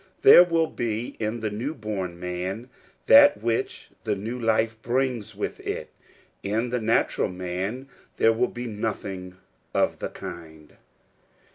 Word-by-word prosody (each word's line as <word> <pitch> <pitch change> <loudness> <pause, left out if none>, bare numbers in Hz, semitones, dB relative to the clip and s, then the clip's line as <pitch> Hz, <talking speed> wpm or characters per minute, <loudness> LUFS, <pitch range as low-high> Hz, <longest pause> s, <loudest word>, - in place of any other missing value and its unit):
There 175 - +10
will 165 -2 +2
be 120 -5 -3
in 110 +1 -2
the 110 -1 -2
new 125 +9 -3
born 95 -6 -4
man 90 +7 -4 0.3
that - - +8
which 115 +1 -2
the 110 -2 0
new 110 +6 -5
life 110 -1 +1
brings 120 -4 -1
with 105 - -4
it: - - -5 0.5
in 110 +4 -1
the 125 -1 -1
nat 110 +1 +2
ural - - +1
man 95 +8 -4 0.3
there 115 - +4
will 115 +2 +1
be 120 0 -7
nothing 100 -4 -4 0.4
of - - +1
the - - -3
kind. 80 -3 -10
110 Hz, 145 wpm, -25 LUFS, 95-120 Hz, 0.5 s, There